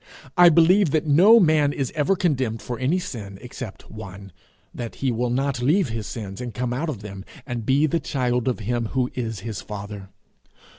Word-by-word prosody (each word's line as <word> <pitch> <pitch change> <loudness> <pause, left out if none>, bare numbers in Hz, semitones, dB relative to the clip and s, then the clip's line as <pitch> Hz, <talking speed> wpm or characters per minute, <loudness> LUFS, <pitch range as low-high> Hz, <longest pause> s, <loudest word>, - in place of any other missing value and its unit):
I 175 -1 +8
believe 170 +3 +5
that 155 +2 0
no 185 +11 +7
man 155 -6 +3
is 135 -4 -3
ever 155 +6 +2
condemned 130 - -1
for 120 -2 -5
any 135 +8 +1
sin 105 - -6
except 125 -3 -9
one 100 -2 -9 0.4
that 120 -2 -6
he 135 -2 -1
will 120 +1 -1
not 130 0 -1
leave 155 +5 +2
his 110 -2 -4
sins 100 -3 -6
and 120 -2 -6
come 125 -1 -2
out 155 +6 -2
of 115 -9 -5
them, 100 -2 -8 0.2
and 120 -4 -5
be 140 +3 +4
the 160 +2 0
child 125 -5 -1
of 125 -3 -1
him 120 +2 -1
who 130 -2 0
is 115 -5 -4
his 110 -1 -5
father. 100 -1 -8
125 Hz, 195 wpm, -23 LUFS, 110-150 Hz, 0.4 s, I